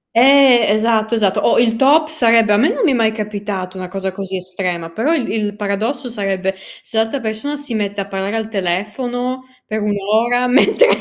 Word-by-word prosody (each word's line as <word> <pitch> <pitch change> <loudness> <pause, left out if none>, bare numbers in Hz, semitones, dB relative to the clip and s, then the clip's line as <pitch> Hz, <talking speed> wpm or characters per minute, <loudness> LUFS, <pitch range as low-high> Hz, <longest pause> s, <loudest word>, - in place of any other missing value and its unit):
Eh! 260 -1 +6
Esatto, 220 +1 +1
esatto. 200 -4 +1
O - - +3
il 230 -1 +2
top 295 +5 +4
sarebbe 230 -8 +3
a - - +4
me 260 +8 +3
non - - -2
mi 315 - +3
è - - +2
mai 225 -2 +2
capitato 205 -3 -5
una 185 -1 -6
cosa 190 0 -4
così 190 -1 -5
estrema, 180 -2 -4
però 235 - -1
il 275 -7 -1
il 210 -2 -2
paradosso 215 +6 -3
sarebbe, 195 -3 -2 0.3
se 220 - -7
l'altra 225 +5 0
persona 225 +6 -4
si 285 -4 -6
mette 205 -1 -2
a 195 - -6
parlare 195 +2 -3
al 220 -1 -3
telefono 245 +7 -3 0.2
per 215 0 -3
1 210 0 0 0.3
ora 245 +1 +1
mentre 280 - +4
220 Hz, 195 wpm, -17 LUFS, 195-245 Hz, 0.3 s, Eh